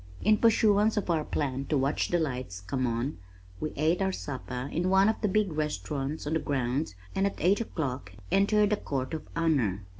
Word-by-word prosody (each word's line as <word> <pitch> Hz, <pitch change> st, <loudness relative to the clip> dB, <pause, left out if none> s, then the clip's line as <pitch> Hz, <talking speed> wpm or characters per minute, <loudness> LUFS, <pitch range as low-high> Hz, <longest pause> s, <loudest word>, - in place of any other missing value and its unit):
In 215 Hz, 0 st, +4 dB
pursuance 215 Hz, -1 st, +4 dB
of 195 Hz, -4 st, 0 dB
our 160 Hz, -2 st, +1 dB
plan 135 Hz, -3 st, -2 dB
to 150 Hz, -, +1 dB
watch 135 Hz, +2 st, +1 dB
the 175 Hz, -, +1 dB
lights 130 Hz, -, -3 dB
come 130 Hz, +7 st, -2 dB
on, 120 Hz, +1 st, -2 dB, 0.4 s
we 155 Hz, -, -3 dB
ate 160 Hz, +5 st, +1 dB
our 190 Hz, 0 st, +2 dB
supper 130 Hz, -5 st, -5 dB
in 175 Hz, +3 st, 0 dB
one 190 Hz, +1 st, +5 dB
of 220 Hz, -, 0 dB
the 210 Hz, -, +2 dB
big 205 Hz, -3 st, +1 dB
restaurants 145 Hz, -, -3 dB
on 150 Hz, -, -1 dB
the 160 Hz, -, +2 dB
grounds 135 Hz, -3 st, -1 dB, 0.2 s
and 195 Hz, +1 st, +2 dB
at 200 Hz, -, -4 dB
eight 190 Hz, +7 st, +3 dB
o'clock 140 Hz, -, -4 dB, 0.2 s
entered 205 Hz, +1 st, +3 dB
the 210 Hz, -, +3 dB
Court 130 Hz, -5 st, -3 dB
of 160 Hz, -, -5 dB
Honor. 130 Hz, -, +1 dB
155 Hz, 200 wpm, -29 LUFS, 130-195 Hz, 0.4 s, one